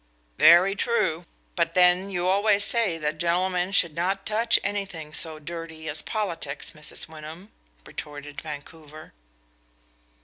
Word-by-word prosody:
"Very 180 Hz, +4 st, +7 dB
true. 190 Hz, -7 st, 0 dB, 0.3 s
But 170 Hz, -2 st, 0 dB
then, 180 Hz, +1 st, +4 dB
you 180 Hz, -2 st, -2 dB
always 200 Hz, +2 st, +3 dB
say 205 Hz, -6 st, 0 dB
that 155 Hz, -1 st, -2 dB
gentlemen 180 Hz, +2 st, 0 dB
should 170 Hz, -5 st, +3 dB
not 190 Hz, +3 st, -1 dB
touch 225 Hz, +2 st, +2 dB
anything 195 Hz, -7 st, -4 dB
so 160 Hz, 0 st, +1 dB
dirty 160 Hz, 0 st, -8 dB
as 155 Hz, 0 st, 0 dB
politics, 165 Hz, -9 st, -3 dB
Mrs. 150 Hz, -1 st, -4 dB
Wyndham," 160 Hz, +5 st, -11 dB, 0.3 s
retorted 145 Hz, -1 st, -8 dB
Vancouver. 155 Hz, 0 st, -10 dB
170 Hz, 125 wpm, -25 LUFS, 155-195 Hz, 0.3 s, Very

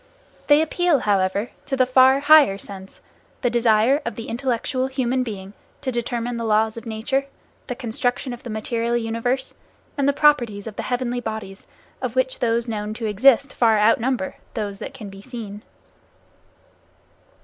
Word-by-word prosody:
They 295 Hz, +1 st, +6 dB
appeal, 335 Hz, -2 st, +1 dB
however, 200 Hz, +2 st, 0 dB, 0.2 s
to 270 Hz, -2 st, -1 dB
the 255 Hz, -, +4 dB
far 260 Hz, +2 st, +5 dB
higher 290 Hz, -9 st, +6 dB
sense, 195 Hz, -1 st, -10 dB, 0.4 s
the 245 Hz, -, +1 dB
desire 235 Hz, +4 st, +3 dB
of 235 Hz, -, -4 dB
the 230 Hz, -, -7 dB
intellectual 255 Hz, +1 st, -1 dB
human 260 Hz, -1 st, -1 dB
being 200 Hz, -5 st, -6 dB, 0.3 s
to 265 Hz, -2 st, -2 dB
determine 240 Hz, 0 st, -3 dB
the 230 Hz, -, -3 dB
laws 220 Hz, 0 st, +2 dB
of 230 Hz, 0 st, -8 dB
nature, 260 Hz, +5 st, -1 dB, 0.4 s
the 250 Hz, -, -3 dB
construction 245 Hz, +2 st, -2 dB
of 240 Hz, -, -9 dB
the 245 Hz, -, -8 dB
material 230 Hz, +2 st, -1 dB
universe, 235 Hz, +3 st, -2 dB, 0.5 s
and 280 Hz, 0 st, +3 dB
the -, -, +5 dB
properties 240 Hz, -9 st, +2 dB
of 220 Hz, -2 st, -7 dB
the -, -, -3 dB
heavenly 245 Hz, -1 st, -1 dB
bodies 215 Hz, -4 st, -6 dB, 0.3 s
of 250 Hz, -2 st, -3 dB
which 260 Hz, 0 st, 0 dB
those 235 Hz, 0 st, 0 dB
known 215 Hz, -1 st, -4 dB
to 225 Hz, -, -5 dB
exist 255 Hz, +6 st, +4 dB
far 225 Hz, -2 st, +3 dB
outnumber 225 Hz, 0 st, +1 dB, 0.2 s
those 205 Hz, -3 st, -4 dB
that 275 Hz, -, -7 dB
can 215 Hz, -6 st, -9 dB
be 195 Hz, 0 st, -11 dB
seen. 215 Hz, -3 st, -8 dB
235 Hz, 160 wpm, -22 LUFS, 220-260 Hz, 0.5 s, They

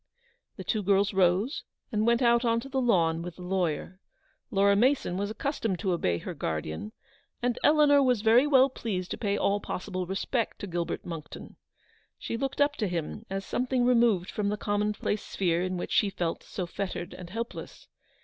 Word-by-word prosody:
The -, -, -7 dB
two 215 Hz, -, 0 dB
girls 200 Hz, +1 st, +2 dB
rose 190 Hz, -, +2 dB, 0.3 s
and 215 Hz, 0 st, +1 dB
went 235 Hz, +1 st, +3 dB
out 235 Hz, 0 st, +4 dB
on 230 Hz, -1 st, +2 dB
to 275 Hz, -, -9 dB
the 265 Hz, 0 st, 0 dB
lawn 170 Hz, -9 st, +2 dB
with 175 Hz, 0 st, -7 dB
the 180 Hz, -, -10 dB
lawyer. 180 Hz, -1 st, -2 dB, 0.5 s
Laura 200 Hz, -3 st, +4 dB
Mason 245 Hz, -4 st, +2 dB
was 200 Hz, +2 st, -2 dB
accustomed 220 Hz, -4 st, -2 dB
to 185 Hz, +2 st, -1 dB
obey 90 Hz, -, +1 dB
her 180 Hz, -, -6 dB
guardian, 80 Hz, -, -4 dB, 0.5 s
and 245 Hz, -1 st, 0 dB
Eleanor 295 Hz, -2 st, +6 dB
was 250 Hz, -5 st, +2 dB
very 235 Hz, +5 st, +5 dB
well 265 Hz, -2 st, +6 dB
pleased 200 Hz, -8 st, -4 dB
to -, -, -3 dB
pay 205 Hz, -2 st, 0 dB
all 200 Hz, +1 st, +1 dB
possible 185 Hz, -2 st, -4 dB
respect 210 Hz, +5 st, -2 dB
to -, -, -6 dB
Gilbert 175 Hz, -3 st, -3 dB
Monckton. 165 Hz, -3 st, -8 dB, 0.6 s
She -, -, -4 dB
looked 270 Hz, +3 st, -3 dB
up 290 Hz, 0 st, +3 dB
to 215 Hz, -, 0 dB
him 175 Hz, +5 st, -4 dB
as 195 Hz, 0 st, -3 dB
something 250 Hz, 0 st, 0 dB
removed 235 Hz, -7 st, +3 dB
from 205 Hz, -1 st, -1 dB
the 210 Hz, -, -1 dB
commonplace 210 Hz, 0 st, -1 dB
sphere 175 Hz, -3 st, 0 dB
in 185 Hz, 0 st, -2 dB
which -, -, -5 dB
she 205 Hz, -, +3 dB
felt 175 Hz, -3 st, -3 dB
so 185 Hz, -, -5 dB
fettered 180 Hz, -1 st, -5 dB
and 180 Hz, -2 st, -9 dB
helpless. 230 Hz, +5 st, -6 dB
200 Hz, 185 wpm, -28 LUFS, 180-235 Hz, 0.6 s, Eleanor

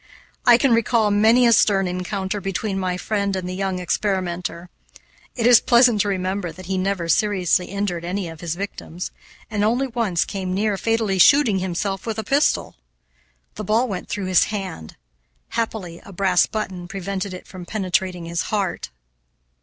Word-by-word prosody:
I 240 Hz, -1 st, +8 dB
can 255 Hz, -1 st, +3 dB
recall 230 Hz, -2 st, +2 dB
many 220 Hz, +4 st, +5 dB
a 235 Hz, -, +5 dB
stern 195 Hz, -4 st, +3 dB
encounter 190 Hz, +2 st, -3 dB
between 195 Hz, +1 st, -2 dB
my 180 Hz, -1 st, -1 dB
friend 200 Hz, 0 st, -1 dB
and 185 Hz, -1 st, -3 dB
the 180 Hz, -, -4 dB
young 190 Hz, 0 st, -2 dB
experimenter. 180 Hz, -2 st, -2 dB, 0.6 s
It 230 Hz, -, -1 dB
is 240 Hz, -2 st, +7 dB
pleasant 240 Hz, -3 st, +5 dB
to 205 Hz, -, 0 dB
remember 185 Hz, -2 st, -2 dB
that 185 Hz, +2 st, -12 dB
he 190 Hz, +2 st, -2 dB
never 185 Hz, -2 st, -1 dB
seriously 185 Hz, -1 st, +2 dB
injured 195 Hz, -4 st, -3 dB
any 180 Hz, +1 st, -3 dB
of 165 Hz, -1 st, -10 dB
his 170 Hz, -1 st, -3 dB
victims, 180 Hz, -2 st, -6 dB, 0.4 s
and 205 Hz, -1 st, 0 dB
only 240 Hz, +5 st, +2 dB
once 230 Hz, -9 st, 0 dB
came 185 Hz, -2 st, -4 dB
near 210 Hz, +1 st, +1 dB
fatally 220 Hz, -2 st, 0 dB
shooting 240 Hz, -3 st, +5 dB
himself 190 Hz, +3 st, -3 dB
with 225 Hz, -1 st, -2 dB
a 220 Hz, -, -2 dB
pistol. 280 Hz, +8 st, +1 dB, 0.8 s
The -, -, -6 dB
ball 230 Hz, +4 st, +2 dB
went 195 Hz, -5 st, -5 dB
through 200 Hz, -2 st, -3 dB
his 185 Hz, -2 st, +4 dB
hand; 190 Hz, -, -6 dB, 0.5 s
happily 210 Hz, -7 st, -4 dB
a -, -, -12 dB
brass 185 Hz, -1 st, +2 dB
button 190 Hz, -5 st, -5 dB
prevented 195 Hz, +1 st, -4 dB
it 180 Hz, -, -11 dB
from 180 Hz, -2 st, -10 dB
penetrating 185 Hz, -3 st, -1 dB
his 170 Hz, +1 st, -2 dB
heart. 200 Hz, -, -2 dB
195 Hz, 170 wpm, -22 LUFS, 180-215 Hz, 0.8 s, I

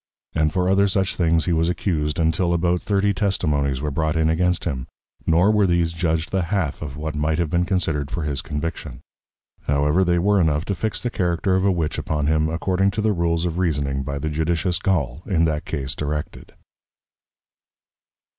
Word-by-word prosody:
And 80 Hz, -1 st, +1 dB
for 90 Hz, +2 st, 0 dB
other 100 Hz, +1 st, +4 dB
such 95 Hz, 0 st, 0 dB
things 80 Hz, -2 st, +2 dB
he 90 Hz, -, +1 dB
was 80 Hz, +1 st, +2 dB
Accused, 75 Hz, -5 st, -1 dB
until 85 Hz, +2 st, +1 dB
about 85 Hz, +1 st, +1 dB
thirty 100 Hz, 0 st, +1 dB
Testimonies 75 Hz, -9 st, 0 dB
were 75 Hz, -, -1 dB
brought 80 Hz, +3 st, 0 dB
in 80 Hz, 0 st, +2 dB
against 90 Hz, +2 st, +1 dB
him; 65 Hz, -7 st, -3 dB, 0.4 s
nor 85 Hz, +6 st, +4 dB
were 105 Hz, -2 st, +3 dB
these 85 Hz, -1 st, +1 dB
judg'd 80 Hz, -1 st, -1 dB
the 95 Hz, -, +1 dB
half 90 Hz, -6 st, -1 dB
of 70 Hz, -1 st, -6 dB
what 75 Hz, +1 st, -4 dB
might 75 Hz, +1 st, 0 dB
have 85 Hz, -3 st, -1 dB
been 85 Hz, 0 st, +2 dB
considered 80 Hz, -7 st, 0 dB
for 85 Hz, -3 st, -3 dB
his 70 Hz, -3 st, -2 dB
Conviction: 75 Hz, -4 st, -5 dB, 0.7 s
However 75 Hz, +5 st, +2 dB
they 85 Hz, -1 st, +2 dB
were 100 Hz, +2 st, +3 dB
enough 80 Hz, 0 st, +1 dB
to 100 Hz, -, -1 dB
fix 110 Hz, +3 st, -2 dB
the 120 Hz, -, -2 dB
Character 90 Hz, 0 st, 0 dB
of 95 Hz, +1 st, +2 dB
a 100 Hz, -, +4 dB
Witch 85 Hz, -4 st, -1 dB
upon 75 Hz, -2 st, -2 dB
him 80 Hz, +1 st, +2 dB
according 95 Hz, +4 st, +1 dB
to -, -, +2 dB
the 110 Hz, -1 st, +2 dB
Rules 85 Hz, -1 st, 0 dB
of 85 Hz, 0 st, -2 dB
Reasoning, 70 Hz, -6 st, 0 dB
by 70 Hz, +1 st, -4 dB
the 80 Hz, +2 st, -2 dB
Judicious 85 Hz, +3 st, 0 dB
Gaule, 80 Hz, -8 st, -1 dB
in 85 Hz, -5 st, +2 dB
that 75 Hz, -2 st, -1 dB
Case 70 Hz, -3 st, -3 dB
directed. 75 Hz, 0 st, -5 dB
80 Hz, 195 wpm, -22 LUFS, 75-90 Hz, 0.7 s, other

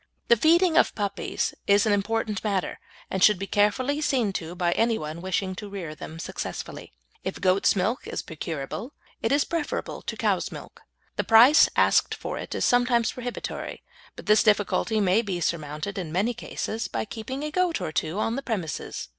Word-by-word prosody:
The 235 Hz, -, +8 dB
feeding 330 Hz, -, +4 dB
of -, -, +4 dB
puppies 205 Hz, -2 st, -2 dB
is 200 Hz, +1 st, +5 dB
an 215 Hz, -, +3 dB
important 210 Hz, 0 st, -1 dB
matter, 200 Hz, -4 st, -1 dB, 0.3 s
and 190 Hz, -1 st, 0 dB
should 210 Hz, -3 st, +6 dB
be 195 Hz, -, -4 dB
carefully 255 Hz, +9 st, +1 dB
seen 250 Hz, -9 st, +1 dB
to 165 Hz, -1 st, -5 dB
by 175 Hz, -1 st, +1 dB
anyone 175 Hz, -7 st, 0 dB
wishing 190 Hz, +1 st, -1 dB
to 205 Hz, -, -7 dB
rear 185 Hz, -6 st, -6 dB
them 160 Hz, +1 st, -9 dB
successfully. 165 Hz, -, -6 dB, 0.3 s
If -, -, -4 dB
goat's 185 Hz, +2 st, +3 dB
milk 205 Hz, +6 st, -1 dB
is -, -, -4 dB
procurable 160 Hz, -, -5 dB, 0.3 s
it 225 Hz, -, 0 dB
is 285 Hz, +1 st, +4 dB
preferable 330 Hz, -3 st, -3 dB
to -, -, -5 dB
cow's -, -, 0 dB
milk. -, -, -10 dB, 0.4 s
The -, -, +1 dB
price 240 Hz, +7 st, +7 dB
asked -, -, +3 dB
for -, -, -5 dB
it -, -, -6 dB
is -, -, 0 dB
sometimes 245 Hz, -2 st, +3 dB
prohibitory, 245 Hz, -1 st, -6 dB, 0.3 s
but -, -, -10 dB
this 215 Hz, +1 st, +5 dB
difficulty 215 Hz, +1 st, +2 dB
may 200 Hz, +2 st, +3 dB
be 195 Hz, -6 st, -3 dB
surmounted 155 Hz, +3 st, -3 dB
in 165 Hz, -4 st, -5 dB
many 200 Hz, +8 st, +1 dB
cases 225 Hz, 0 st, -4 dB
by -, -, -3 dB
keeping 260 Hz, +6 st, -6 dB
a 300 Hz, -, -3 dB
goat 360 Hz, 0 st, +1 dB
or -, -, -3 dB
two 160 Hz, +3 st, -2 dB
on 225 Hz, +2 st, 0 dB
the 275 Hz, -, -3 dB
premises. 195 Hz, -, -4 dB
210 Hz, 180 wpm, -26 LUFS, 185-240 Hz, 0.4 s, The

